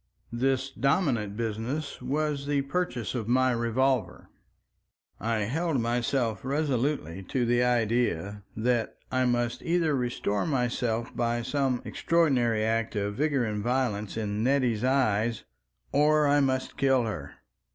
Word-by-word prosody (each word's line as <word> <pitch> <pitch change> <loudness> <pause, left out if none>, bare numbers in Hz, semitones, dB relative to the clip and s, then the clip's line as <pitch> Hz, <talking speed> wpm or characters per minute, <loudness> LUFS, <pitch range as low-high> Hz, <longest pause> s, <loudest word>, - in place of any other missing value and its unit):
This 130 +2 0
dominant 130 - 0
business 115 +7 -3
was 145 +2 -1
the 145 -1 +1
purchase 135 - -2
of 115 -4 -3
my 130 +1 +3
revolver. 120 -1 0 0.9
I 115 -1 0
held 145 +7 0
myself 120 -1 0
resolutely 135 - -1
to 125 -2 +1
the 120 +1 +2
idea 115 -5 0 0.2
that 115 0 0
I 130 0 +2
must 120 -1 0
either 165 -3 +1
restore 120 -4 -1
myself 120 -4 -1
by 120 0 0
some 130 0 0
extraordinary 130 -10 +2
act 115 0 0
of 105 0 -1
vigor 140 0 +1
and 105 -1 -2
violence 115 -4 -1
in 105 -1 -2
Nettie's 125 -4 +1
eyes 120 -4 +1 0.5
or 150 +1 +4
I 145 +1 +4
must 130 -2 0
kill 135 -2 +3
her. 90 -11 -5
125 Hz, 130 wpm, -28 LUFS, 115-135 Hz, 0.9 s, or